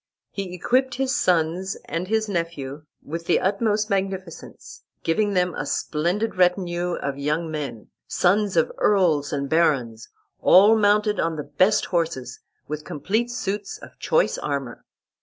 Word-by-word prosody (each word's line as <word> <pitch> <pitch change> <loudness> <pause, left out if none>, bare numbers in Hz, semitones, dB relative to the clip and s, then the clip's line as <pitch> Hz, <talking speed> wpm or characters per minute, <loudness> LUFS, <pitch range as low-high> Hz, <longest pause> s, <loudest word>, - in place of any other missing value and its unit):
He 195 -3 -5
equipped 255 +7 +1
his 265 0 0
sons 175 +2 +1
and 170 +2 -3
his 220 +1 0
nephew 155 -6 -4 0.2
with 165 +3 -6
the 175 - +3
utmost 210 +2 0
magnificence, 190 -3 -4 0.2
giving 205 +4 +1
them 180 -1 +2
a 145 - -4
splendid 175 +10 -1
retinue 180 -1 +1
of 140 0 -4
young 155 +3 -1
men, 145 -8 -5 0.2
sons 195 +1 +1
of 165 - +3
earls 170 -8 +2
and 140 -1 -2
barons, 135 -8 +1 0.3
all 205 +4 +7
mounted 210 0 +2
on 165 -1 0
the 150 - -4
best 185 +9 +2
horses, 160 -8 -2 0.3
with 150 +1 -5
complete 200 +9 -1
suits 205 -4 -4
of - - -14
choice - - +1
armor. 140 -5 -4
180 Hz, 140 wpm, -23 LUFS, 150-205 Hz, 0.3 s, all